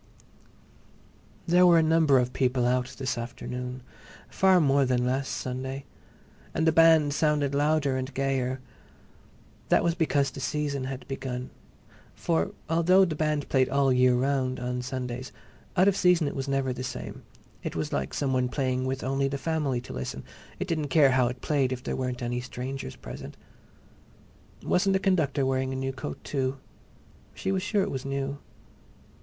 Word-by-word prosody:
There 180 +1 +5
were 170 -1 +7
a 165 - +5
number 160 -3 +4
of 125 0 0
people 125 -1 +1
out 125 +1 0
this 130 -3 -2
afternoon, 125 +1 -6 0.5
far 190 -1 +4
more 140 -3 +3
than 125 -1 +1
last 130 +2 -1
Sunday. 130 +2 -4 0.7
And 160 - +1
the 160 - +5
band 160 -3 +5
sounded 145 -2 +1
louder 145 -1 +2
and 130 +1 -4
gayer. 130 -1 -1 1.1
That - - +4
was 170 - +2
because 145 -5 +1
the - - -8
Season 140 -1 -2
had 130 -1 -6
begun. 130 -2 -5 0.6
For 80 +1 0 0.2
although 175 +4 +4
the 170 - -2
band 150 -1 -1
played 130 -1 +2
all 140 0 +2
the 130 - +3
year 125 0 +4
round 130 0 0
on 125 0 -3
Sundays, 125 0 -5 0.5
out 185 +2 +5
of 200 - +4
season 180 -5 +3
it - - -4
was 135 0 -3
never 135 -2 0
the 130 - -5
same. - - -6 0.4
It - - -5
was 80 -2 -3
like 70 0 -1
some 135 -2 0
one 125 -1 +1
playing 130 -1 -1
with 130 0 -2
only 135 +1 0
the 140 +1 -2
family 145 -5 -1
to - - -9
listen; 65 - -5 0.4
it 185 - -2
didn't 155 -4 -1
care 140 -1 +5
how 125 -1 +3
it 125 +1 -5
played 140 -4 +1
if 125 -1 -4
there - - -2
weren't 125 -1 -3
any 120 +1 -2
strangers 125 - -6
present. - - -9 1.3
Wasn't 195 +2 +2
the - - +4
conductor 155 -8 +1
wearing 130 0 0
a - - -3
new 135 0 -2
coat, 75 - -6
too? 135 -1 -2 0.8
She 190 - -2
was 190 -1 0
sure 205 0 +1
it - - -3
was 135 -1 -4
new. 140 +1 -3
135 Hz, 175 wpm, -27 LUFS, 125-150 Hz, 1.3 s, were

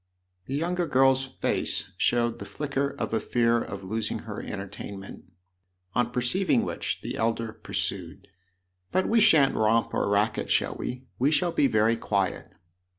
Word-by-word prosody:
The 135 - -2
younger 175 +3 0
girl's 135 0 +4
face 130 - -2
showed 120 -1 +1
the - - -6
flicker 140 -1 -2
of - - -3
a 110 - +2
fear 115 -1 +2
of 100 0 -6
losing 110 +3 -2
her 105 -2 -5
entertainment; 100 0 -7 0.7
on 125 -1 +1
perceiving 125 +10 +2
which - - -3
the - - -4
elder 115 0 -1
pursued: 110 - -4 0.3
" 90 0 -49
But 185 - +1
we 230 - +4
shan't 145 -8 +6
romp 110 0 +2
or - - 0
racket 105 +2 +1
shall - - +2
we? 125 +1 -5 0.2
We 135 +4 +4
shall 170 +3 +2
be 140 - +3
very 110 0 +3
quiet." 100 -4 -1
115 Hz, 155 wpm, -27 LUFS, 105-135 Hz, 0.7 s, shan't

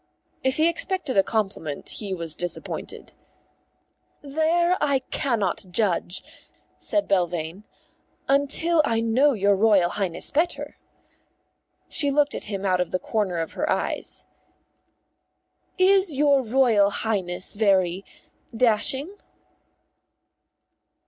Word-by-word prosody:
If 265 0 +1
he 315 +1 +4
expected 340 -3 0
a 195 - +6
compliment 195 -9 -3
he 205 -3 -4
was 165 -4 -1
disappointed. 175 0 -3 1.1
"There 320 +5 +1
I 280 -3 +1
cannot 230 -7 -1
judge," 180 -2 -1 0.6
said 310 - +2
Belvane, 175 0 -1 0.6
"until 285 +4 +2
I 230 -4 0
know 255 +6 +3
your 200 -2 +2
Royal 195 -4 +3
Highness 185 -4 -3
better." 330 +4 -1 1.1
She 290 -2 +3
looked 290 0 +2
at - - -5
him 200 -1 -5
out 185 -1 +2
of 180 - -2
the - - -1
corner 195 -2 -2
of 165 -1 -3
her - - -2
eyes. - - -3 1.5
"Is 375 -3 +3
your 280 -1 +3
Royal 230 -4 +3
Highness 190 -4 -2
very 190 -3 +1 0.5
dashing?" 265 - +2
220 Hz, 110 wpm, -24 LUFS, 190-285 Hz, 1.5 s, a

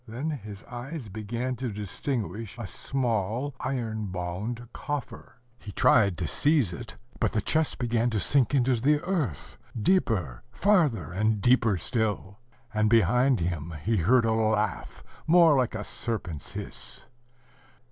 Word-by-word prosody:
Then 130 +8 -3
his 105 -8 -7
eyes 125 0 -7
began 115 +5 -3
to 125 -2 -3
distinguish 110 +1 -4
a 120 - -5
small, 120 +3 -2
iron 115 -5 -3
bound 95 +7 -4
coffer. 145 -5 -5 0.2
He 100 - -9
tried 100 -5 +4
to 85 -3 -2
seize 145 - +2
it; - - -8 0.2
but - - +1
the 110 - +2
chest 160 +7 0
began 120 -1 +1
to 110 -3 -1
sink 135 +4 +3
into 130 -1 +3
the 145 +3 +3
earth, 165 - -3 0.2
deeper, 105 - +1
farther, 165 - +2
and 105 +3 +1
deeper 115 -2 +3
still: 105 -1 -1 0.3
and 110 0 +2
behind 120 +2 +4
him 85 -1 -3
he 110 +1 +1
heard 115 +7 +4
a 115 - +2
laugh, 110 -1 -1 0.2
more 165 -2 +6
like 125 -4 +1
a 105 - -3
serpent's 95 - -4
hiss. - - -5
115 Hz, 140 wpm, -27 LUFS, 105-130 Hz, 0.3 s, more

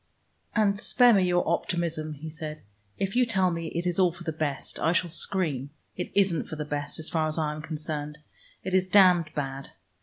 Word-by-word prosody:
"And 205 -2 +2
spare 245 +2 +5
me 195 -3 +4
your 175 0 +1
optimism," 165 -2 -1
he 155 +3 -8
said. 155 -1 -7 0.3
"If 195 +2 -2
you 250 - +5
tell 190 -6 +2
me 165 -1 -3
it 170 +2 -3
is 175 +1 0
all 180 -2 +4
for 175 +1 -11
the 165 - -2
best, 150 -3 -2
I 165 - +2
shall 175 -1 +1
scream. 155 -7 -1 0.3
It 180 - -5
isn't 190 -4 +2
for - - -6
the 150 -1 -4
best, 145 -1 -3
as 160 - -3
far 160 -2 +1
as 155 - -2
I 155 -2 0
am 155 - -7
concerned. 150 -1 -5 0.5
It 190 - -4
is 185 0 +3
damned 180 -4 +5
bad. 135 -1 -4
165 Hz, 210 wpm, -27 LUFS, 155-185 Hz, 0.5 s, spare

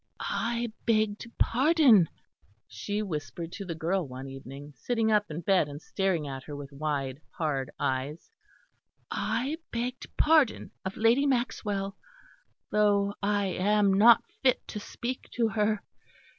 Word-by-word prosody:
"I 235 -1 -2
begged 215 -1 +1
pardon," 260 - +5 0.6
she 205 - -3
whispered 160 - -5
to 200 - -6
the 170 -3 -4
girl 170 +1 -1
one 130 +1 -7
evening, 135 +2 -9
sitting 225 - 0
up 210 -1 +2
in 155 +2 -5
bed 180 -3 +3
and 145 0 -7
staring 180 -3 -1
at 135 -1 -5
her 145 - -7
with 145 0 -8
wide, 140 -2 -2
hard 145 -6 -2
eyes, 135 - -2 0.8
"I 285 +6 -1
begged 245 +2 -3
pardon 305 -6 +3
of 190 0 -5
Lady 235 +6 +4
Maxwell, 210 -6 -1 0.8
though 205 -1 +3
I 205 0 +1
am 200 +1 +2
not 225 +4 +7 0.2
fit 260 -2 +2
to 210 - -4
speak 245 +4 -5
to 230 -2 +1
her. 210 0 0
200 Hz, 135 wpm, -29 LUFS, 150-230 Hz, 0.8 s, not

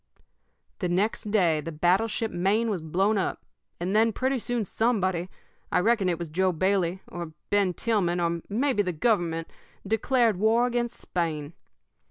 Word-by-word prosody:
"The 180 - -1
next 205 +4 0
day 175 -7 +3
the 165 - -6
battleship 195 +8 +1
Maine 210 +6 +1
was 185 -5 -2
blown 195 +7 +1
up, 190 - -3 0.3
and 180 +4 -1
then 225 +1 +4
pretty 260 +3 0
soon 235 -1 -1
somebody 190 -5 0 0.4
I - - +2
reckon 205 -1 +2
it 170 - 0
was 170 0 -5
Joe 185 +4 +1
Bailey, 185 +1 0
or 170 -2 -7 0.2
Ben 200 -3 +2
Tillman, 195 -7 0
or 170 -1 0
maybe 240 +1 +1
the 180 -3 -2
Government 165 -3 0 0.4
declared 225 +1 +2
war 225 +4 +3
against 240 -1 -2
Spain. 160 -3 -3
190 Hz, 155 wpm, -26 LUFS, 175-225 Hz, 0.4 s, then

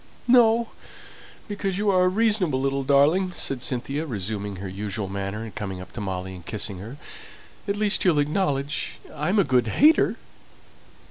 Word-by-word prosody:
"No, 235 -2 +5 0.8
because 195 -2 -2
you 205 0 +2
are 185 -1 +4
a - - +4
reasonable 200 -8 +1
little 135 0 -1
darling," 150 +7 +3
said 135 -3 0
Cynthia, 135 +4 -2
resuming 105 -3 -4
her 95 +1 -6
usual 100 +1 -4
manner, 100 +2 -4
and 110 -3 -8
coming 95 -2 -5
up 90 0 -10
to 115 - -7
Molly, 95 -1 -4
and 90 -2 -11
kissing 100 0 -4
her. 115 +9 -9 0.7
"At 200 - 0
least 210 -1 +2
you'll 175 -5 +3
acknowledge 145 -2 -1 0.2
I'm 155 +8 -1
a 200 - +5
good 125 -6 +2
hater!" 300 - +4
135 Hz, 160 wpm, -24 LUFS, -, 0.8 s, No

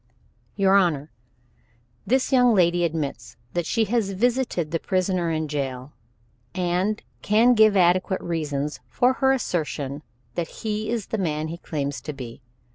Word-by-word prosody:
"Your 195 -1 +4
Honor, 160 -6 +1 1.0
this 260 +5 +2
young 250 -3 +5
lady 175 -1 +3
admits 160 -4 -3 0.2
that 175 -2 -1
she 230 - +2
has 210 -2 0
visited 235 -6 0
the 165 - 0
prisoner 185 -1 0
in 160 -1 -1
the - - -4
jail, 135 -2 -4 0.6
and 185 +4 0 0.2
can 225 +4 +4
give 215 -3 +5
adequate 185 +1 +3
reason 150 -4 -2 0.2
for 250 +1 +3
her 265 0 +5
assertion 150 - -2 0.3
that 170 +3 -2 0.2
he 215 0 -2
is 230 -4 -1
the 220 - -2
man 155 -3 -1
he 170 - -5
claims 140 -4 -3
to 150 - -5
be. 125 -2 -9
175 Hz, 150 wpm, -24 LUFS, 155-215 Hz, 1.0 s, young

